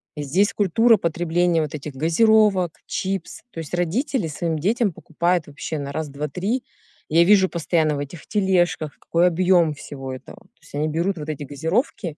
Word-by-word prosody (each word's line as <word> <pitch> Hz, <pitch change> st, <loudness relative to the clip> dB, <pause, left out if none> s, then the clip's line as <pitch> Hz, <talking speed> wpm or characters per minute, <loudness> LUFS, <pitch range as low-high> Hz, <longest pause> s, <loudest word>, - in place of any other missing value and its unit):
и 150 Hz, -, -4 dB
здесь 190 Hz, +10 st, +2 dB
культура 220 Hz, +4 st, +4 dB
потребления 170 Hz, -1 st, +1 dB
вот 155 Hz, 0 st, -4 dB
этих 145 Hz, -1 st, -7 dB
газировок, 185 Hz, +4 st, +3 dB, 0.2 s
чипс. 190 Hz, -2 st, -3 dB
То 165 Hz, -, -8 dB
есть 160 Hz, +1 st, -5 dB
родители 210 Hz, -, -1 dB
своим 160 Hz, +1 st, -2 dB
детям 210 Hz, +6 st, +1 dB
покупают 170 Hz, +1 st, -1 dB
вообще 145 Hz, +2 st, -6 dB
на 140 Hz, -1 st, -5 dB
раз-два-три. 160 Hz, -, -3 dB, 0.4 s
Я 165 Hz, +2 st, +5 dB
вижу 190 Hz, 0 st, +5 dB
постоянно 160 Hz, -2 st, 0 dB
в -, -, -4 dB
этих 145 Hz, +3 st, -7 dB
тележках, 180 Hz, -6 st, 0 dB
какой 170 Hz, +2 st, +2 dB
объем 175 Hz, -2 st, +3 dB
всего 135 Hz, -2 st, -8 dB
этого. 130 Hz, -, -10 dB
То -, -, -28 dB
есть -, -, -19 dB
они 150 Hz, +2 st, 0 dB
берут 170 Hz, +4 st, -1 dB
вот 150 Hz, +1 st, -6 dB
эти 150 Hz, -1 st, -4 dB
газировки 160 Hz, -, -2 dB
170 Hz, 170 wpm, -22 LUFS, 150-190 Hz, 0.4 s, Я